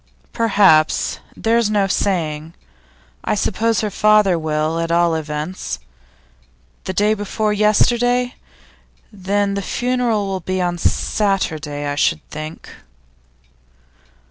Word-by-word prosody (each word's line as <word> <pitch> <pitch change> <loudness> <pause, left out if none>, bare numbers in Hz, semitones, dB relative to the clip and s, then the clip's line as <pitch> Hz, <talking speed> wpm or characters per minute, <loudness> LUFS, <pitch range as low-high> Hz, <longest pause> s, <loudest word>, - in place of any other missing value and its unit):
'Perhaps; 195 -8 +3 0.2
there's 230 -1 +2
no 205 -2 +2
saying. 165 -5 -1 0.7
I - - 0
suppose 220 +2 0
her 210 -2 -2
father 210 -2 +4
will, 155 0 -1
at 165 0 -2
all 170 0 +3
events. 155 - -4 1.1
The 190 - -3
day 210 +3 +2
before 210 0 -1
yesterday? 240 +4 +2 0.8
Then 200 +1 -1
the 200 - -2
funeral 245 -1 0
will 195 -1 -3
be 185 +1 -3
on 175 -1 -1
Saturday, 160 -9 -1
I 145 - -1
should 155 +2 0
think. 155 +1 -8
195 Hz, 110 wpm, -19 LUFS, 160-215 Hz, 1.1 s, father